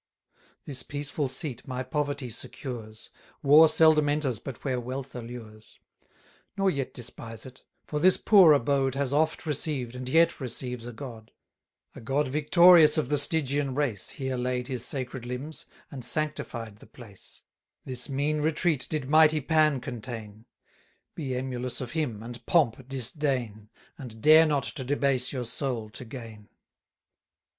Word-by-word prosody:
This 135 -3 -5
peaceful 145 -1 -4
seat 140 -1 -6
my 130 0 -3
poverty 140 -1 -3
secures; 110 -2 -7 0.3
War 150 +3 +8
seldom 155 -2 +4
enters 145 -6 -1
but 135 -4 -9
where 130 -3 -1
wealth 130 +2 -6
allures: 115 -3 -10 0.8
Nor 195 -1 +2
yet 140 -4 -3
despise 115 -2 -8
it; 130 0 -13 0.2
for 150 - -3
this 185 +3 +4
poor 190 -7 +6
abode 135 0 +1
Has 140 -1 -1
oft 160 +3 +1
received, 140 -5 -2
and 125 0 -6
yet 165 +4 +3
receives 125 -2 -4
a - - -6
God; 115 -2 -10 0.6
A - - -11
God 135 +4 0
victorious 155 +2 +6
of 150 -5 0
the 145 - +2
Stygian 140 -2 0
race 130 -9 -1
Here 130 -2 -4
laid 125 0 -2
his 125 -3 -1
sacred 130 -2 -1
limbs, 125 +6 -6 0.2
and 135 -4 -7
sanctified 120 -6 -2
the - - -16
place, 115 -8 -12 0.4
710 - - -7
This 125 +1 -2
mean 145 +3 -1
retreat 155 -2 0
did 150 -4 -2
mighty 155 +1 +5
Pan 155 -1 +2
contain: 115 -4 -8 0.7
Be 135 -5 -4
emulous 125 -1 -3
of 125 -2 -5
him, 125 -10 -3
and 120 +1 -9
pomp 130 -6 +2
disdain, 125 -5 -3 0.3
And 120 -5 -9
dare 155 +6 +7
not 145 -3 +1
to 135 - -5
debase 135 -1 +1
your 125 -3 -4
soul 115 -3 -3
to 125 - -9
gain. 110 -3 -10
130 Hz, 150 wpm, -27 LUFS, 120-150 Hz, 0.8 s, War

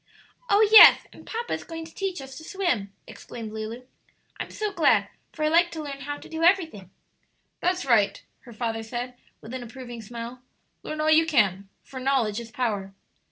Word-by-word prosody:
"Oh, 420 +1 +5
yes, 440 - +10
and - - -16
papa 470 +1 -4
is - - -4
going 325 -1 -7
to 320 - -14
teach 380 -5 -3
us 270 0 -10
to - - -12
swim!" 315 - -2
exclaimed 225 -3 -9
Lulu; 220 +3 -6 0.5
"I'm - - -5
so 425 -1 -4
glad, 320 -7 +3 0.2
for 305 - -3
I - - +3
like 340 +2 +4
to 315 -2 -5
learn 280 -2 -7
how 290 +1 -5
to - - -13
do 320 0 -6
everything." 330 - +2 0.7
"That's 360 -3 0
right," 225 -6 +3 0.2
her 240 - -15
father 225 0 -3
said, 240 +3 -5 0.3
with 225 - -10
an 260 - -5
approving 240 0 -9
smile; 235 +3 -8 0.4
"learn 310 0 -5
all 310 0 +2
you 320 +1 +5
can, 200 - +1
for 260 - -9
'knowledge 255 -5 0
is 235 -1 -9
power.'" 205 -5 -3
260 Hz, 190 wpm, -25 LUFS, 225-325 Hz, 0.7 s, yes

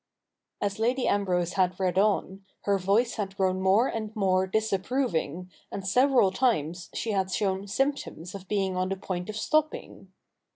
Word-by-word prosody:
As 200 +1 -2
Lady 245 +3 +1
Ambrose 180 -3 +1
had 185 -1 +1
read 185 -1 +1
on, 195 -1 +1 0.2
her 200 -1 +1
voice 205 +7 +1
had 195 -2 -4
grown 185 -1 +1
more 195 +7 +4
and 215 -2 -4
more 190 -2 +2
disapproving, 195 - -1 0.2
and 195 -1 -5
several 250 -1 +4
times 180 - 0
she 225 - -2
had 190 -2 0
shown 190 +1 -1
symptoms 200 - -2
of 195 -1 -9
being 195 -2 0
on 185 0 0
the 195 - -2
point 180 0 -4
of 215 - -4
stopping. 310 +6 -1
195 Hz, 160 wpm, -27 LUFS, 185-220 Hz, 0.2 s, more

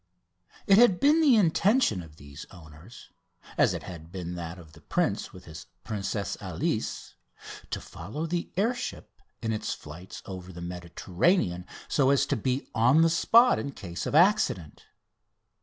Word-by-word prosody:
It 195 +1 +6
had 215 -7 +5
been 300 +3 +4
the 285 -6 +6
intention 195 - +3
of 80 -3 -13
these 70 0 -11
owners, 85 +5 -14 0.4
as - - +3
it - - -6
had 85 -2 -10
been 90 -2 -5
that 85 0 -6
of 80 -3 -14
the 80 - -16
prince - - -1
with 90 - -13
his 80 -1 -10 0.2
Princesse 100 -1 -3
Alice, - - -3 0.6
to - - -3
follow 110 - -6
the 170 +1 -3
air 220 +6 +2
ship 245 - -8 0.2
in 110 0 0
its 110 - -3
flights 85 +5 -11
over 95 -1 -8
the 85 - -10
Mediterranean, 90 - -1 0.2
so 135 -2 +2
as 140 0 +3
to 140 - -1
be 130 +3 -2
on 125 +8 +4
the 165 - +3
spot 235 +8 +5
in 140 - -5
case 85 -7 -6
of - - -2
accident. 155 - +2
100 Hz, 160 wpm, -27 LUFS, -, 0.6 s, It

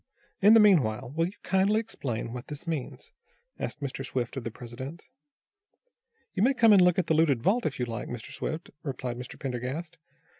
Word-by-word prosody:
"In 210 +3 +8
the - - +8
meanwhile 130 - +3
will 165 +1 +2
you 190 - -10
kindly 195 +3 +3
explain, 125 - -4
what 125 0 -7
this 150 +3 -7
means?" 160 -6 -5 0.5
asked 150 - -4
Mr. 135 -1 -4
Swift 125 -2 -3
of 135 - -4
the 115 - -3
president. 125 +7 -9 1.3
"You 185 - -1
may 265 +5 +4
come 230 -3 +6
and 195 - +7
look 180 -1 +4
at 185 - +2
the - - +2
looted 150 -7 +3
vault, 230 +5 +2
if 145 - -4
you 125 - +1
like, 115 -1 -5
Mr. 120 -3 -7
Swift," 160 +2 -5
replied 130 -5 -4
Mr. 125 - -8
Pendergast. 135 +6 -4
145 Hz, 190 wpm, -28 LUFS, 125-185 Hz, 1.3 s, In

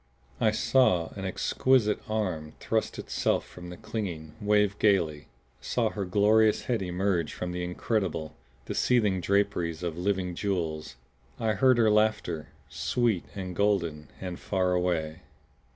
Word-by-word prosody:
I 110 - +4
saw 110 -6 +3
an 95 -1 -7
exquisite 110 +3 +2
arm 90 -8 -2
thrust - - -1
itself - - 0
from 90 0 -10
their 90 - -8
clinging, 95 -8 -5
wave 105 -1 +2
gaily; 80 -8 +2 0.3
saw 110 - 0
her 100 -2 -3
glorious 105 +3 +3
head 120 -4 -1
emerge 90 -2 -1
from 90 - -4
the 90 0 -3
incredible, 90 -2 -2 0.3
the - - -4
seething 105 -7 +2
draperies 90 -3 0
of 85 -1 -3
living 95 -1 0
jewels. 85 -7 -3 0.4
I 110 -2 +1
heard 130 +1 +4
her 110 -2 +4
laughter, 105 -7 +1 0.2
sweet 115 -7 0
and 95 -2 -5
golden 85 -7 0
and 90 -2 -5
far 95 -2 0
away. 85 -3 -1
95 Hz, 135 wpm, -28 LUFS, 85-105 Hz, 0.4 s, I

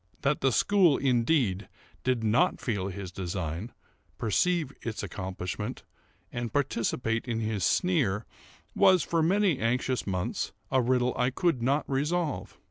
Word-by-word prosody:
That 140 +1 +1
the 135 - +3
school, 185 - +4
indeed, 120 - +1 0.3
did 125 -3 0
not 110 +4 +2
feel 100 -6 -2
his 95 -1 -6
design, 90 +2 -4 0.5
perceive 155 - +1
its 115 -2 -4
accomplishment, 95 -2 -5 0.5
and 120 -1 -3
participate 115 -4 -1
in 115 -2 -1
his 110 -4 -2
sneer, 125 - +1 0.5
was, 185 -4 +5
for 165 -1 0
many 185 -2 +2
anxious 125 +1 0
months, 95 +4 -2 0.2
a 130 -1 +4
riddle 125 0 +2
I 125 0 +3
could 150 -1 0
not 140 +5 +1
resolve. 150 +3 -1
125 Hz, 130 wpm, -28 LUFS, 105-145 Hz, 0.5 s, was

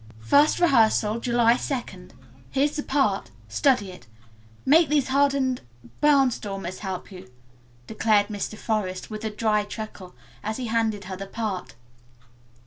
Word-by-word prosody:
"First 285 - +4
rehearsal 225 -8 +3
July 235 -1 +3
2d. 235 -9 -5 0.4
Here's 285 +2 +1
the 295 - -1
part. 265 - 0 0.2
Study 205 - +1
it. 120 -10 -14 0.6
Make 310 +2 +5
these 290 -3 +2
hardened 275 -2 +2 0.4
barnstormers 220 -10 +1
help 190 -1 -6
you," 180 -8 -11 0.6
declared 215 - +2
Mr. 210 +1 -4
Forest 205 -4 -3
with 215 0 -6
a 220 - -1
dry 210 0 +1
chuckle, 205 -3 -8 0.3
as 215 +1 -3
he 255 - -4
handed 220 -2 0
her 190 0 -6
the 195 +1 -7
part. 195 - -4
220 Hz, 135 wpm, -25 LUFS, 195-265 Hz, 0.6 s, Make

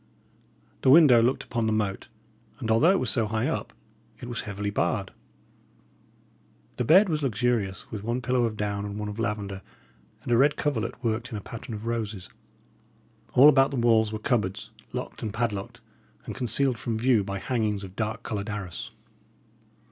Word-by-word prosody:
The - - +3
window 135 -5 +8
looked 125 +3 +1
upon 115 -2 -2
the - - +1
moat, 105 -3 -1 0.5
and 110 - -2
although 115 +10 +5
it 190 0 +4
was - - 0
so 115 -4 +1
high 110 +1 -1
up, - - -3 0.5
it 120 - -8
was 120 -1 -3
heavily 100 0 -4
barred. - - -1 1.7
The 125 - 0
bed 185 - +6
was 155 -3 -1
luxurious, 115 -5 -1
with 105 -2 -5
one 120 +3 -1
pillow 125 -1 +1
of 110 -2 -3
down 105 -1 -2
and 100 0 -5
one 105 0 -4
of 105 +2 -7
lavender, 105 -4 -3 0.6
and - - -4
a 120 - +5
red 140 +4 +4
coverlet 120 -4 -2
worked 115 +1 -1
in 110 - -5
a - - -4
pattern 115 +2 -8
of 105 +1 -8
roses. 110 -5 -3 1.0
All 135 +4 +8
about 135 -2 +6
the 140 - -4
walls 115 -2 +3
were 110 - -3
cupboards, 105 -5 -1 0.2
locked - - -6
and 110 - -3
padlocked, 105 -3 -3 0.4
and - - -5
concealed 125 +1 0
from 110 +1 -2
view 115 -2 +3
by 100 0 -4
hangings 105 -3 -1
of 95 -1 -10
dark 110 +2 -3
coloured 105 0 -4
arras. 100 -5 -5
110 Hz, 180 wpm, -26 LUFS, 105-125 Hz, 1.7 s, window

